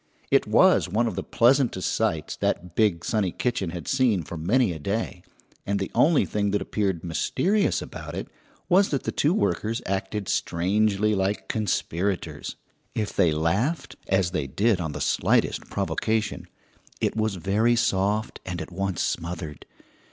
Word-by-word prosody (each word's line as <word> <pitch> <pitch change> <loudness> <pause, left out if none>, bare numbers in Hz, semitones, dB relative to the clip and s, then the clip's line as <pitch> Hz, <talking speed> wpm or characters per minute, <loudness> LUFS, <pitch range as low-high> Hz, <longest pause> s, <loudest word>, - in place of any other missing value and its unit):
It - - +4
was - - +5
one 110 +6 +1
of 115 - -1
the 95 - -2
pleasantest 120 -3 +2
sights 80 -1 -1
that 90 -1 -1
big, 85 -5 +2
sunny 105 -5 0
kitchen 105 -6 -1
had 85 0 -7
seen 125 -9 +2
for 85 - -7
many 100 +6 +2
a 80 - -7
day, 100 +1 -3 0.4
and 100 0 -1
the 95 - -3
only 160 -1 +4
thing 105 -1 -1
that 100 +1 +1
appeared 95 -5 -1
mysterious 195 - +1
about - - -8
it - - -4 0.4
was 195 +2 +4
that 140 - -1
the - - -2
two 150 - +2
workers 115 - 0
acted 95 +1 -2
strangely 100 +4 +1
like 95 +1 -1
conspirators. 90 -6 -2 0.4
If 105 -2 -2
they 90 -5 +4
laughed 95 - 0
as 95 -2 +2
they 90 -6 -2
did 100 - +1
on 80 -3 -3
the - - -5
slightest - - +1
provocation 110 -1 -1 0.5
it - - 0
was 110 -2 0
very 105 +6 +2
soft 105 -1 0
and 90 -2 -4
at - - -6
once 95 -1 -2
smothered. 80 -3 -4
100 Hz, 160 wpm, -25 LUFS, 90-110 Hz, 0.5 s, was